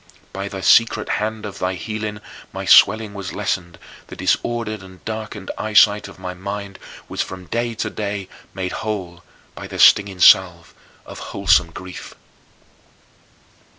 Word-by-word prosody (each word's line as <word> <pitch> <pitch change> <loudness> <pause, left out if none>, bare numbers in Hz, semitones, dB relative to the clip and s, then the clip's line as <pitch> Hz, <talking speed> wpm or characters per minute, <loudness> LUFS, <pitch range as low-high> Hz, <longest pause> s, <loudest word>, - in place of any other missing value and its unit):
By 100 +1 -4
the 95 -2 -7
secret 115 +4 +4
hand 110 0 -3
of 100 -1 -8
thy 90 +1 -1
healing 105 +3 -5 0.3
my - - -6
swelling 110 -2 +5
was 100 -2 -6
lessened, 90 -4 -3 0.3
the - - -10
disordered 110 +3 -1
and 95 -1 -15
darkened 110 -2 -5
eyesight 105 -1 +4
of 100 - -13
my 90 0 -6
mind 100 +1 -6 0.3
was - - -3
from 95 -1 -6
day 115 +4 -2
to 110 0 -2
day 100 -2 -4 0.2
made 95 -1 -4
whole 90 -5 -5 0.3
by - - -9
the - - -8
stinging 100 -2 +5
salve 85 -2 +5 0.3
of - - -10
wholesome 95 -3 +3
grief. 90 +2 -10
100 Hz, 145 wpm, -20 LUFS, 95-110 Hz, 0.3 s, swelling